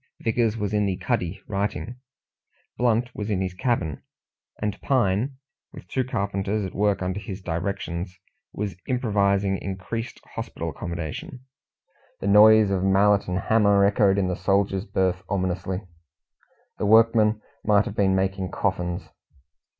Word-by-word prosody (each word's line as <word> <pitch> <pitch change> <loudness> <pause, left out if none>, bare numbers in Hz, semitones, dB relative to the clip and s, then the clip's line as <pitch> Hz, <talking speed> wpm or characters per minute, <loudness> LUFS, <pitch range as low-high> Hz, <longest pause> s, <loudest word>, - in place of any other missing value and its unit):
Vickers 115 -1 +1
was 105 -1 -2
in 105 -1 +2
the 95 -2 -1
cuddy 95 -7 -2
writing; 105 +4 -3 0.8
Blunt 120 0 +1
was 105 0 -5
in 100 -3 0
his 95 -1 -2
cabin; 90 - -1 0.6
and 105 -1 -3
Pine, 125 +1 +1 0.4
with - - -11
two 130 - 0
carpenters 100 -3 -2
at 95 - -6
work 100 -1 +1
under 95 +2 -2
his 100 -1 -7
directions, 90 0 -4 0.3
was 100 -3 -4
improvising 100 -5 +1
increased 100 +5 -5
hospital - - -5
accommodation. 85 - -6 0.8
The - - -6
noise 105 +1 +7
of 95 -1 0
mallet 100 +1 +3
and 90 0 -1
hammer 100 -3 +4
echoed 100 -1 +3
in 95 -2 +1
the 90 - -1
soldiers' 95 +1 +1
berth 95 -4 0
ominously; 95 0 -2 1.0
the 105 - 0
workmen 110 0 +5 0.2
might 105 -1 +4
have 100 - -6
been 95 -3 +2
making 95 0 -1
coffins. 90 -2 -2
100 Hz, 135 wpm, -25 LUFS, 95-110 Hz, 1.0 s, noise